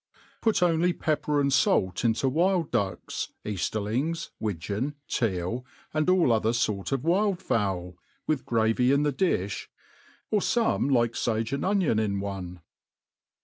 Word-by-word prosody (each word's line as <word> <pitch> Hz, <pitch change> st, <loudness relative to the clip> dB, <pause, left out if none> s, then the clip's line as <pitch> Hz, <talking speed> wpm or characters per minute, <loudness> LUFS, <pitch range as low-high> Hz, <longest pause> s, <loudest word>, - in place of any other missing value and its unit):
Put 210 Hz, -5 st, +2 dB
only 175 Hz, +1 st, +3 dB
pepper 155 Hz, -2 st, -1 dB
apd 140 Hz, -2 st, +4 dB, 0.3 s
fait -, -, -5 dB
into 115 Hz, +4 st, +2 dB
wild 170 Hz, +4 st, +1 dB
ducks, 100 Hz, -5 st, -2 dB
eaft^rliilgSy 110 Hz, -, -2 dB
wi 105 Hz, -3 st, -1 dB
geon, 105 Hz, -, -3 dB
teal, 110 Hz, +1 st, -1 dB, 0.3 s
and 155 Hz, +3 st, +1 dB
all 180 Hz, -10 st, +4 dB
other 110 Hz, +1 st, +1 dB
Tort 105 Hz, -3 st, -1 dB
of 135 Hz, -1 st, -1 dB
wild 190 Hz, +3 st, +2 dB
fow)> 95 Hz, -, -1 dB, 0.3 s
with 155 Hz, -4 st, 0 dB
gravy 115 Hz, +2 st, +2 dB
in 140 Hz, +1 st, +3 dB
the 145 Hz, -1 st, +1 dB
lifli, 105 Hz, -, -1 dB, 0.6 s
or 210 Hz, -, +3 dB
fooie 220 Hz, -, +1 dB
like 120 Hz, -3 st, +3 dB
fage 115 Hz, +1 st, -1 dB
and 140 Hz, -, -1 dB
onion 185 Hz, -, +2 dB
in 100 Hz, -2 st, 0 dB
one. 95 Hz, -3 st, -5 dB
125 Hz, 145 wpm, -27 LUFS, 105-165 Hz, 0.6 s, apd